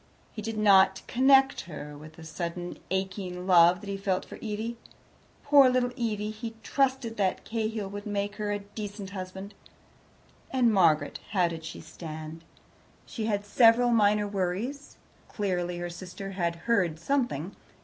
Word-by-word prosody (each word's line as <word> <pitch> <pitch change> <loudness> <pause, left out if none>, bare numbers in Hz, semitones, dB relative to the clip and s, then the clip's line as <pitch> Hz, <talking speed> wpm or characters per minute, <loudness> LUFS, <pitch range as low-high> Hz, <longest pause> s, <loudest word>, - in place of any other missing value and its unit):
He 215 - -7
did 225 +1 -4
not 195 -2 +5
connect 270 +2 +4
her 150 -3 -8
with 155 +2 -12
the 165 - -13
sudden 170 +2 -5
aching 190 -1 -3
love 180 -1 +6
that 205 - -10
he 200 0 -3
felt 195 -1 -1
for - - -10
Evie. 225 +2 -4 0.7
Poor 285 -2 +7
little 250 -1 +1
Evie! 215 -4 -2
he 225 +1 -7
trusted 260 -1 0
that 195 -2 0
Cahill 220 -2 -2
would 205 +2 -7
make 205 0 -2
her 210 -1 -2
a 205 - 0
decent 205 -1 -7
husband. 190 +1 -7 1.0
And 245 -4 +3
Margaret? 155 -6 +3
How 180 -4 +3
did 165 -1 -7
she 160 - -7
stand? 160 0 -8 0.6
She 220 -2 -4
had 205 -2 -1
several 235 +3 +5
minor 210 -2 +3
worries. 205 +9 -3 0.3
Clearly 180 -4 -2
her 175 0 -4
sister 185 +2 -8
had 170 -3 -1
heard 185 -9 +2
something. 200 - -1
200 Hz, 150 wpm, -28 LUFS, 180-225 Hz, 1.0 s, Poor